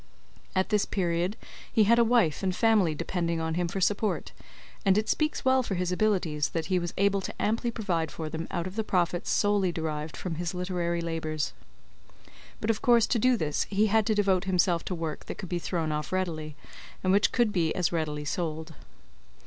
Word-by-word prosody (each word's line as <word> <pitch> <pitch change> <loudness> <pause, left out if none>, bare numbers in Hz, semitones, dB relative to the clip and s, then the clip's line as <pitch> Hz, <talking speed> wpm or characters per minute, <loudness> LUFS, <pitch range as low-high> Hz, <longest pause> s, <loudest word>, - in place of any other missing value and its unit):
At 185 0 +1
this 210 -2 +2
period 175 +2 -1 0.3
he 220 - +4
had 235 +3 +5
a - - +7
wife 225 -9 +2
and 185 -2 0
family 210 -9 +3
depending 170 0 -2
on 160 0 -2
him 175 +1 0
for 195 - -3
support, 195 - 0 0.5
and 195 0 +4
it 215 0 +1
speaks 305 -3 0
well 260 0 +4
for 215 -6 -3
his 180 0 -1
abilities, 180 -7 +1
that 165 -1 0
he 180 - +4
was 175 -1 -3
able 200 0 +2
to - - -7
amply 230 +3 0
provide 180 -9 -1
for 160 0 -5
them 160 +1 -5
out 170 -2 -2
of 185 +1 -6
the 220 - +1
profits 175 -3 0
solely 205 -3 +2
derived 155 -2 -4
from 180 - -4
his 175 +1 -3
literary 175 -2 -1
labours. 160 -2 -2 1.1
But 215 - +1
of 215 - -4
course 235 -2 +5
to 235 - 0
do 250 +2 +4
this 150 -6 -1
he 205 +2 +2
had 220 -1 +3
to 215 - +2
devote 195 -2 +2
himself 180 -2 +2
to 185 - -3
work 160 -2 -5
that - - -5
could 185 - -7
be 175 - -1
thrown 165 -3 -2
off 150 -2 -3
readily, 160 -5 -2 0.5
and 185 0 +3
which 205 +1 +4
could 235 -4 +2
be 165 -4 +1
as 180 - +1
readily 150 -3 -2
sold. 160 0 -3
180 Hz, 205 wpm, -28 LUFS, 165-205 Hz, 1.1 s, a